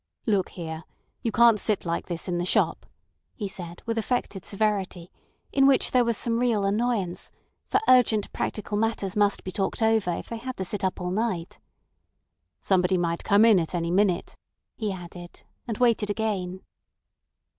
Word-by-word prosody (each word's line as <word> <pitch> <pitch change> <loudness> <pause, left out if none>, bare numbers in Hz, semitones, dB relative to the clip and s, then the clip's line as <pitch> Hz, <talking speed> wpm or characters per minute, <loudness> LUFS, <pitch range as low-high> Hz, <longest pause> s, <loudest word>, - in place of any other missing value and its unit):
"Look 200 -5 +1
here! 160 -2 -6 0.4
You 230 - -1
can't 230 -2 +5
sit 210 -3 -1
like 170 0 -2
this 170 0 -4
in 175 -1 -1
the - - 0
shop," - - +1 0.5
he 210 - -4
said 175 -3 -9
with 230 0 -1
affected 215 -5 -2
severity, 195 -4 -2 0.4
in 275 -1 +4
which 275 -1 +3
there 250 -1 +4
was 235 -2 +1
some 230 -1 +1
real 230 -5 +1
annoyance; 205 -3 -1 0.4
for 400 - +2
urgent 230 -5 +4
practical 210 -1 -3
matters 215 -4 -1
must 205 -1 +2
be 185 - -5
talked 195 +4 -2
over 220 -4 +2
if - - -6
they 230 - -4
had 255 +3 -6
to 190 - -3
sit 195 +1 -3
up 190 - -1
all 180 0 -3
night. 190 -4 -2 1.0
"Somebody 185 -1 +2
might 170 -1 -1
come 205 +2 +5
in 220 -5 +6
at 165 +1 -3
any 170 -1 -1
minute," 190 -1 +1 0.4
he 215 -3 -2
added, 175 -1 -10 0.2
and 225 -3 -3
waited 230 -4 +2
again. 195 -4 -2
205 Hz, 170 wpm, -26 LUFS, 180-225 Hz, 1.0 s, in